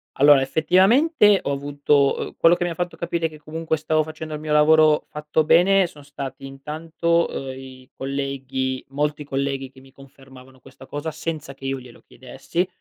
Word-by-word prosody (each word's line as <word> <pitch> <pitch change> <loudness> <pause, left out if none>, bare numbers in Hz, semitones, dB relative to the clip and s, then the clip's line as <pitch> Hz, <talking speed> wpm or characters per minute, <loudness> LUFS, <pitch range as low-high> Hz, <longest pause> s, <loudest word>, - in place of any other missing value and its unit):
Allora, 145 -1 +6
effettivamente 195 - +4
ho - - -2
avuto, 140 0 +1
uhm - - -6
quello 170 +1 +5
che 175 - -3
mi - - -1
ha - - -3
fatto 175 +1 -4
capire 170 -1 -2
che 155 - -13
comunque 160 +1 -3
stavo 155 0 +1
facendo 155 0 -8
il 150 - -4
mio 155 -1 -5
lavoro 155 0 +5
fatto 150 +1 -1
bene 185 +3 +4
sono 145 -3 -15
stati 135 -2 -8
intanto, 160 +5 -1
uhm, 135 -1 -5
i 130 -1 -12
colleghi 135 -1 -3
molti 150 +1 -2
colleghi 135 -1 -3
che 130 - -17
mi 135 0 -18
confermavano 135 -1 -16
questa 135 0 -15
cosa 145 +2 -5
senza 155 -4 -5
che 135 - -13
io 135 0 -2
glielo 125 -2 -15
chiedessi. 135 +8 -4
145 Hz, 180 wpm, -22 LUFS, 135-160 Hz, -, Allora